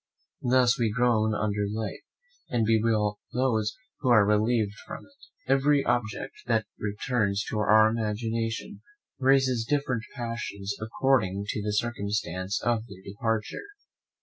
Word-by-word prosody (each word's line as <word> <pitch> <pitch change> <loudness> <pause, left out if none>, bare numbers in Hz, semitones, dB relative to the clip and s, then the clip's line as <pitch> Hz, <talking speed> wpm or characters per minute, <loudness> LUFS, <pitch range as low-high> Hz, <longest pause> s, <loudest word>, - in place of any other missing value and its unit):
Thus 125 0 +3
we 115 -2 +2
groan 110 -2 +2
under 105 -1 -1
life, 110 0 -4 0.5
and 115 -2 +1
bewail 110 -2 +2
those 115 -4 +1 0.2
who 130 - 0
are 110 -4 +6
relieved 105 0 +2
from - - -8
it. 280 0 -21 0.2
Every 135 +2 +3
object 120 -3 -1
that 115 -2 +2
returns 105 -1 -1
to 110 - -1
our 110 +1 +6
imagination 115 - -3 0.4
raises 130 -3 +3
different 130 -2 0
passions, 115 -5 -4
according 110 -4 +1
to 105 - -2
the 105 +1 -2
circumstance 100 -4 -2
of 120 -1 0
their 95 -4 -12
departure. 110 - -3
110 Hz, 125 wpm, -27 LUFS, 105-120 Hz, 0.5 s, are